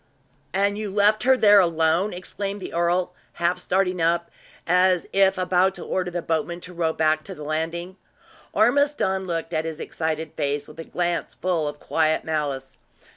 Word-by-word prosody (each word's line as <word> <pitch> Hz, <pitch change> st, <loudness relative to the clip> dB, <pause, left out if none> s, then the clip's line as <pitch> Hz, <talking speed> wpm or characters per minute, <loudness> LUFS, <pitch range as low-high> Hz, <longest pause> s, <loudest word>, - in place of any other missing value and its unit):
"And 200 Hz, +2 st, +1 dB
you 215 Hz, -1 st, -3 dB
left 205 Hz, +2 st, +3 dB
her 260 Hz, 0 st, +5 dB
there 205 Hz, -3 st, +7 dB
alone?" 170 Hz, +2 st, +2 dB
exclaimed 200 Hz, +2 st, -5 dB
the 190 Hz, -, -7 dB
earl, 175 Hz, +1 st, +1 dB, 0.2 s
half 170 Hz, +1 st, 0 dB
starting 185 Hz, -1 st, 0 dB
up, 170 Hz, +1 st, +1 dB, 0.3 s
as 180 Hz, 0 st, +3 dB
if 195 Hz, -1 st, +4 dB
about 185 Hz, +1 st, +2 dB
to -, -, -7 dB
order 185 Hz, -1 st, -1 dB
the 175 Hz, -1 st, -4 dB
boatman 165 Hz, +2 st, -1 dB
to 180 Hz, -, -10 dB
row 165 Hz, -2 st, 0 dB
back 155 Hz, -1 st, +1 dB
to 190 Hz, -, -7 dB
the 150 Hz, -, -9 dB
landing. 165 Hz, +4 st, -3 dB, 0.5 s
Ormiston 240 Hz, -6 st, +2 dB
looked 165 Hz, -1 st, -3 dB
at 155 Hz, 0 st, 0 dB
his 160 Hz, -1 st, -5 dB
excited 160 Hz, -1 st, -3 dB
face 145 Hz, 0 st, -2 dB
with -, -, -13 dB
a 165 Hz, -, -6 dB
glance 175 Hz, -1 st, -2 dB
full 170 Hz, -3 st, -1 dB
of 145 Hz, 0 st, -6 dB
quiet 155 Hz, -1 st, +1 dB
malice. 140 Hz, -4 st, -3 dB
175 Hz, 175 wpm, -24 LUFS, 160-190 Hz, 0.5 s, there